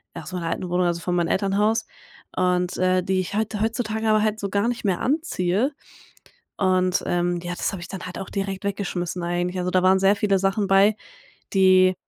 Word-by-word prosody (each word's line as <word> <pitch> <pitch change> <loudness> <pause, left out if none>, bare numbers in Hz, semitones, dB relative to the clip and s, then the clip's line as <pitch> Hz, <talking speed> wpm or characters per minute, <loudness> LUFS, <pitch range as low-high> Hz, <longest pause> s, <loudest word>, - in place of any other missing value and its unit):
Ja, - - -7
aus 185 - -10
meiner 175 -2 -3
alten 180 +2 -3
Wohnung, 180 +1 +1
also 170 0 -1
von 180 +1 -1
meinem 170 -1 +1
Elternhaus, 210 +3 +1 0.5
und, 180 -1 +1
äh, 185 0 +2
die 190 +1 0
ich 185 +2 -3
heute 215 -1 -1
heutzutage 220 -1 -1
aber 215 0 +4
halt 215 0 0
so 200 - -3
gar 200 +3 +1
nicht 240 -2 -3
mehr 190 -3 +1
anziehe. 255 - 0 0.9
Und, 185 -1 +2
ähm, 175 0 0
ja, 175 0 -4
das - - -2
habe 190 - -6
ich 175 - -7
dann 190 -3 -7
halt 180 - -7
auch 195 - -6
direkt 195 -1 -4
weggeschmissen 180 -3 -3
eigentlich. 175 +1 -2
Also, 180 0 -1
da 185 0 +2
waren 190 +1 +5
sehr 195 +2 +4
viele 200 -1 +1
Sachen 195 +1 0
bei, 195 +2 +5 0.6
die 185 -1 +5
190 Hz, 210 wpm, -23 LUFS, 180-205 Hz, 0.9 s, waren